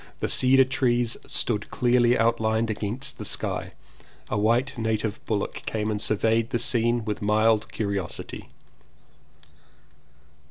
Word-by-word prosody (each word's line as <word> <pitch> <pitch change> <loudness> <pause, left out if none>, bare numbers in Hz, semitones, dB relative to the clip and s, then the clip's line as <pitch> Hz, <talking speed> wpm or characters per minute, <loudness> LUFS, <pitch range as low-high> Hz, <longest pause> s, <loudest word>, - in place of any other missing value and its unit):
The - - -1
cedar 130 +1 +5
trees 120 -3 +1
stood 105 -3 -1
clearly 120 0 +3
outlined 115 -1 +1
against 115 +7 -3
the - - -6
black - - 0
sky. - - -3 0.6
A 105 - -1
white 120 +6 +1
native 110 -2 -2
bullock 105 -3 -2
came 110 -1 -1
and 105 -1 -2
surveyed 110 +2 +1
the - - 0
scene 120 -1 0
with 105 -2 -3
mild 110 +1 +2
curiosity. 100 -4 -4
115 Hz, 125 wpm, -25 LUFS, 105-120 Hz, 0.6 s, cedar